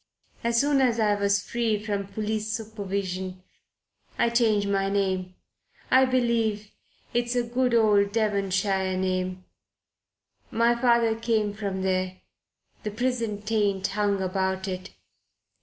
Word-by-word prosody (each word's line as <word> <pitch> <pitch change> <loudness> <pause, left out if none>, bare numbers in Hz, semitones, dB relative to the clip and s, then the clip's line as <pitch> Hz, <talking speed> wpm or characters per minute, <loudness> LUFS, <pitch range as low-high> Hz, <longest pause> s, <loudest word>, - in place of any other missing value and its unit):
As 235 0 +2
soon 285 0 +3
as 240 -3 +2
I 210 -2 +3
was 200 0 +1
free 230 -3 0
from 205 -2 -3
police 215 +1 -3
supervision 195 -4 -4 0.7
I 235 - +2
changed 220 -4 +2
my 195 -1 +1
name 190 -2 -1 0.6
I 260 0 +6
believe 230 -5 0 0.4
it's 240 +1 0
a 245 - +2
good 245 +1 +1
old 205 -3 +4
Devonshire 195 -3 0
name; 185 0 -2 1.0
my 235 +1 +3
father 235 -2 +3
came 220 -2 0
from 200 -2 -3
there 185 0 0 0.6
the 210 - -3
prison 230 -2 -2
taint 205 -3 0
hung 200 -1 0
about 190 0 -1
it. 185 0 -5
210 Hz, 125 wpm, -26 LUFS, 190-230 Hz, 1.0 s, I